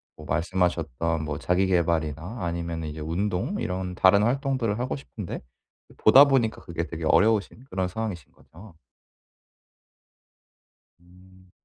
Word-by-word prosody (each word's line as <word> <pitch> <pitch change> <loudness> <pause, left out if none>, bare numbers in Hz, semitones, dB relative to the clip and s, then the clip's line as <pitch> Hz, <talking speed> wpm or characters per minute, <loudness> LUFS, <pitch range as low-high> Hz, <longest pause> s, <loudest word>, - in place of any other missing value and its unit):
뭐 75 - -12
말씀하셨던 85 -2 -1
뭐 75 -1 -3
자기 90 +2 +1
계발이나 85 +2 0
아니면은 85 -1 -3
이제 75 +1 -7
운동 95 - -2
이런 90 0 -3
다른 100 +3 +5
활동들을 125 -3 0
하고 125 +1 -2
싶은 115 -7 -8
데 - - -6 0.6
보다 135 +6 +8
보니까 130 -6 +1
그게 85 -1 -4
되게 85 -2 -7
어려우신 110 +7 +2
그런 95 -1 -1
상황이신 95 -5 -5
거죠? 90 +2 -16 2.3
음. 95 +1 -21
90 Hz, 290 characters per minute, -26 LUFS, 85-110 Hz, 2.3 s, 보다